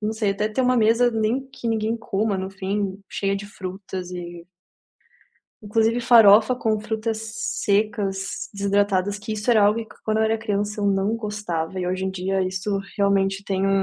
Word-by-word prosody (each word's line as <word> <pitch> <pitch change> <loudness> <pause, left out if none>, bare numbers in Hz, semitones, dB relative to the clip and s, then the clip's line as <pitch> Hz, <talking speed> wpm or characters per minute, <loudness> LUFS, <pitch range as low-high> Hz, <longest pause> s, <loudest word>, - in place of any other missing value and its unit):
não 215 +1 -1
sei, 215 -2 0
até 210 +2 -1
ter 215 +5 -2
uma 250 0 +3
mesa 230 +2 +4
nem 225 +4 0
que 265 -3 -8
ninguém 225 0 0
coma 215 -3 -1
no 190 0 -3
fim 195 0 -3
cheia 195 0 -1
de 200 - -5
frutas 185 -2 -7
e 175 -1 -7 1.1
Inclusive 225 +3 +1
farofa 230 0 +6
com 220 -3 0
frutas 220 0 -2 0.4
secas, 200 -2 -1
desidratadas 200 0 +1
que 215 +1 -5
isso 215 +3 -1
era 220 -3 +5
algo 210 +3 +3
que, - - -17
quando 220 0 0
eu 220 - +3
era 220 0 +1
criança, 210 -1 -2
eu 205 - +1
não 200 +2 +1
gostava 195 -6 -4
e, 180 - -2
hoje 185 +1 -1
em 190 - -1
dia, 190 +1 -1
isso 190 +2 -2 0.2
realmente 200 -1 +1
tem 195 -1 -1
um 195 0 +2
205 Hz, 180 wpm, -23 LUFS, 195-220 Hz, 1.1 s, farofa